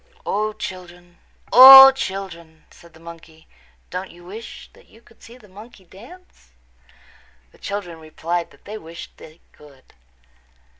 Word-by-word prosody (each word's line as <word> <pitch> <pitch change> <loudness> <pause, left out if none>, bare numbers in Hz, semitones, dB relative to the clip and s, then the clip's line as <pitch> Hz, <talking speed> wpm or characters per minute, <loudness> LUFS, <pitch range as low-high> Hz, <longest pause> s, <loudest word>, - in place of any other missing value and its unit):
"O, 215 +1 -3
children, 175 -3 -12 0.3
O, 270 +2 +10
children," 190 -9 -9
said 170 -1 -21
the - - -19
monkey, 165 -1 -16 0.4
"don't 185 +1 -7
you 175 0 -19
wish 215 +6 -12
that - - -24
you 225 - -22
could 230 -1 -27
see 235 +2 -17
the 220 -4 -21
monkey 205 +1 -17
dance?" 230 - -19 1.0
The - - -25
children 185 -5 -8
replied 165 +2 -6
that - - -26
they 215 +1 -10
wished 165 -1 -14
they 160 +1 -18
could. 140 -3 -22
185 Hz, 140 wpm, -19 LUFS, 165-215 Hz, 1.0 s, O